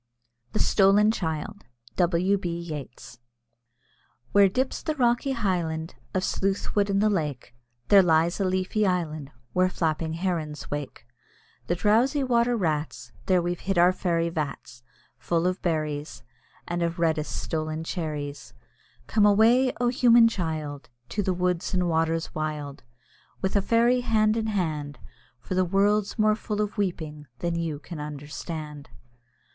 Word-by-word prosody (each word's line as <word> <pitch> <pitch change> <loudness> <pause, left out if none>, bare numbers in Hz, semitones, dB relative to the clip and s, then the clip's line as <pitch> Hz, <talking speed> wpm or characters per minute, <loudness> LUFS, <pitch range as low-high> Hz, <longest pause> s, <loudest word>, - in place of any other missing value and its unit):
THE - - -1
STOLEN 205 +2 +4
CHILD. 175 +2 -4 0.3
W. 180 +2 +2
B. 170 -2 -3
YEATS. 150 -7 -8 1.1
Where 200 0 +6
dips 260 +7 -1
the 310 - -2
rocky 245 +1 +1
highland 175 -7 -2 0.2
Of 185 - +1
Sleuth 195 0 -1
Wood 205 -1 +2
in 195 - +1
the 210 +2 +3
lake, 150 -9 -3 0.4
There 200 -1 +8
lies 165 0 +2
a - - +1
leafy 185 +3 0
island 155 -6 -2 0.2
Where 185 0 +3
flapping 160 -2 -1
herons 160 -4 -3
wake 145 -4 -5 0.6
The 175 - +1
drowsy 235 - +2
water 240 -1 +2
rats. 155 -6 -2 0.2
There 185 -2 +3
we've 175 0 -2
hid 195 -1 -2
our 175 +2 +5
fairy 170 -3 0
vats 145 -7 -5 0.4
Full 170 0 0
of 185 +1 0
berries, 155 -6 -2 0.4
And 175 0 -2
of 170 0 -1
reddest 160 -3 0
stolen 155 0 -3
cherries. 150 -4 -5 0.5
Come 210 -2 +3
away, 230 +5 +5
O, 245 0 +2
human 240 -2 +6
child! 160 -7 -4 0.2
To 205 - -1
the 190 - 0
woods 180 +1 -1
and 180 -1 +1
waters 165 0 0
wild, 150 -2 -4 0.6
With 190 +1 -1
a 200 - +4
fairy 235 +4 +3
hand 220 -2 +2
in 225 -1 -1
hand, 155 - -2 0.4
For 185 - -6
the 185 0 +3
world's 200 +4 +1
more 215 -1 +4
full 210 -1 -4
of 210 -1 -1
weeping 155 -6 -3
than 170 +7 -2
you 165 -3 -2
can 155 +3 -9
understand. 150 0 -7
175 Hz, 145 wpm, -26 LUFS, 155-205 Hz, 1.1 s, There